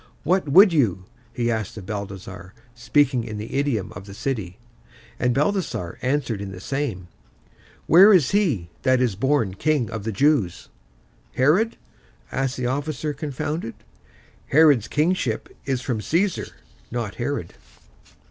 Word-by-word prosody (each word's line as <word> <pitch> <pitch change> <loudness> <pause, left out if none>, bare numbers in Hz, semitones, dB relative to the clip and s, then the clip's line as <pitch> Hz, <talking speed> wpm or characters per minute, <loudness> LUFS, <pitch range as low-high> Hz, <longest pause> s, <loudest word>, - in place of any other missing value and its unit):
"What 180 -2 +1
would 190 +5 +7
you?" 100 - +1 0.3
he 120 0 -1
asked 110 -1 -3
of 100 - -8
Balthasar, 100 -1 -7 0.2
speaking 125 +1 +1
in 110 -2 -6
the 105 +2 -7
idiom 135 -8 -1
of 90 +3 -10
the 100 - -10
city. 105 -6 -3 0.6
And 125 - +2
Balthasar 145 - -1
answered 125 -5 -1
in 100 -1 -6
the 95 - -9
same, 115 -6 -3 0.8
"Where 190 +6 +8
is 170 -10 +4
he 145 - +1
that 130 -1 +3
is 120 -6 +1
born 125 -3 +1
King 145 +3 0
of 110 -3 -5
the 110 - -2
Jews?" 115 - +1 0.7
"Herod?" 180 - +2 0.5
asked 135 -2 -1
the 125 - -2
officer, 145 +3 -2
confounded. 145 -2 -4 0.7
"Herod's 145 -6 +5
kingship 180 - 0 0.2
is 130 -2 0
from 120 -4 -2
Caesar; 180 - 0 0.4
not 115 -4 -3
Herod." 120 -9 -3
125 Hz, 140 wpm, -23 LUFS, 105-150 Hz, 0.8 s, Where